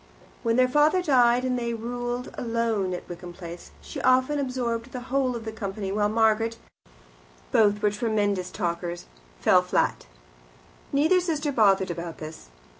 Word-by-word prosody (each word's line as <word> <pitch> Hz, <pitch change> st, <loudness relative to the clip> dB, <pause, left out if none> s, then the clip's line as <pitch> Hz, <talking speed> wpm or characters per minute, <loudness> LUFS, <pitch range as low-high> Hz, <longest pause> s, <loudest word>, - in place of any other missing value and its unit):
When 230 Hz, 0 st, +1 dB
their 255 Hz, +1 st, +4 dB
father 300 Hz, +7 st, +3 dB
died 250 Hz, -5 st, +4 dB
and 250 Hz, -1 st, 0 dB
they 235 Hz, -1 st, -2 dB
ruled 245 Hz, +2 st, -4 dB
alone 230 Hz, -5 st, -1 dB
at -, -, -8 dB
Wickham 175 Hz, 0 st, -8 dB
Place, 170 Hz, -1 st, -9 dB
she -, -, -7 dB
often 255 Hz, +3 st, +3 dB
absorbed 245 Hz, -4 st, -2 dB
the 250 Hz, -, -5 dB
whole 260 Hz, -2 st, +1 dB
of 230 Hz, -1 st, -6 dB
the 220 Hz, -, -4 dB
company, 200 Hz, -2 st, -4 dB
while 205 Hz, +1 st, +1 dB
Margaret 225 Hz, +1 st, +2 dB, 0.9 s
both 210 Hz, -1 st, +3 dB
were 210 Hz, -, +4 dB
tremendous 205 Hz, -4 st, 0 dB
talkers 175 Hz, -2 st, -3 dB, 0.4 s
fell -, -, +5 dB
flat. -, -, 0 dB, 0.8 s
Neither 310 Hz, +6 st, +4 dB
sister 310 Hz, -4 st, -1 dB
bothered 195 Hz, -6 st, +3 dB
about 170 Hz, -1 st, -6 dB
this. 155 Hz, -, -9 dB
230 Hz, 150 wpm, -26 LUFS, 195-255 Hz, 0.9 s, fell